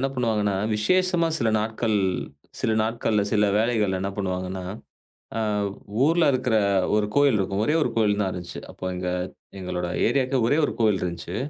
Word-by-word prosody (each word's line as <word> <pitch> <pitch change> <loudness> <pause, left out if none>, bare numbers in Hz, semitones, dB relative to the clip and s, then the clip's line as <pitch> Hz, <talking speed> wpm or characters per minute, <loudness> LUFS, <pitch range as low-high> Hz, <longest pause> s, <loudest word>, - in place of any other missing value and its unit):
என்ன 135 - +1
பண்ணுவாங்கன்னா, 110 -5 0 0.2
விசேஷமா 180 - +2
சில 115 - +1
நாட்கள் 110 0 0 0.6
சில 110 - +1
நாட்கள்ல 110 -2 0
சில 105 - +3
வேலைகள்ல 110 -4 +1
என்ன 100 +1 -2
பண்ணுவாங்கன்னா, 95 -1 -3 0.7
அ - - 0 0.7
ஊர்ல 165 +1 +3
இருக்கிற 125 -3 +1 0.4
1 105 -1 +2
கோவில் 140 -6 +4
இருக்கும். 100 +1 -1
ஒரே 150 - +1
1 - - +1
கோயில் 105 -2 +2
தான் 95 -2 0
இருந்தது. 90 -1 -7
அப்போ - - -10
எங்க 90 0 -3 0.5
எங்களோட 90 -1 -3 0.2
ஏரியாவுக்கு 130 +1 +1
ஒரே 145 - +2
1 - - -1
கோவில் 105 -4 +3
இருந்ததுச்சு. 85 0 -4
105 Hz, 155 wpm, -24 LUFS, 95-125 Hz, 0.7 s, கோவில்